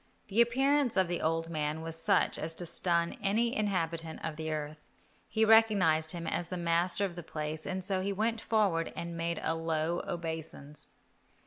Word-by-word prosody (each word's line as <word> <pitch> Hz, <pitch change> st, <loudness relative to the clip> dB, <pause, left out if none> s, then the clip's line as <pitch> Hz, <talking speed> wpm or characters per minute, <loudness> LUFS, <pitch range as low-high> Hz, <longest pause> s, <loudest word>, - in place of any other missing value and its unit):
The 215 Hz, +4 st, +4 dB
appearance 265 Hz, +1 st, +2 dB
of 190 Hz, -1 st, +4 dB
the 175 Hz, 0 st, -2 dB
old 165 Hz, +1 st, 0 dB
man 155 Hz, 0 st, -2 dB
was 165 Hz, 0 st, -4 dB
such 165 Hz, -, +2 dB
as 165 Hz, +1 st, -4 dB
to 175 Hz, -, 0 dB
stun 170 Hz, 0 st, 0 dB
any 225 Hz, +4 st, +1 dB
inhabitant 165 Hz, -6 st, -2 dB
of 160 Hz, -2 st, -3 dB
the 160 Hz, 0 st, -4 dB
earth. 150 Hz, 0 st, -5 dB, 0.4 s
He 220 Hz, 0 st, +2 dB
recognized 200 Hz, -8 st, +5 dB
him 170 Hz, -1 st, -5 dB
as 170 Hz, +1 st, -2 dB
the 180 Hz, -, -4 dB
master 170 Hz, +3 st, +1 dB
of 180 Hz, -3 st, -5 dB
the 175 Hz, -, -6 dB
place, 155 Hz, -1 st, -5 dB
and 185 Hz, 0 st, -3 dB
so 190 Hz, 0 st, 0 dB
he 200 Hz, +1 st, -1 dB
went 225 Hz, +3 st, 0 dB
forward 195 Hz, -7 st, +1 dB
and 170 Hz, 0 st, -5 dB
made 170 Hz, 0 st, -2 dB
a -, -, +1 dB
low 165 Hz, +1 st, -1 dB
obeisance. 160 Hz, -3 st, -6 dB
170 Hz, 185 wpm, -31 LUFS, 160-200 Hz, 0.4 s, recognized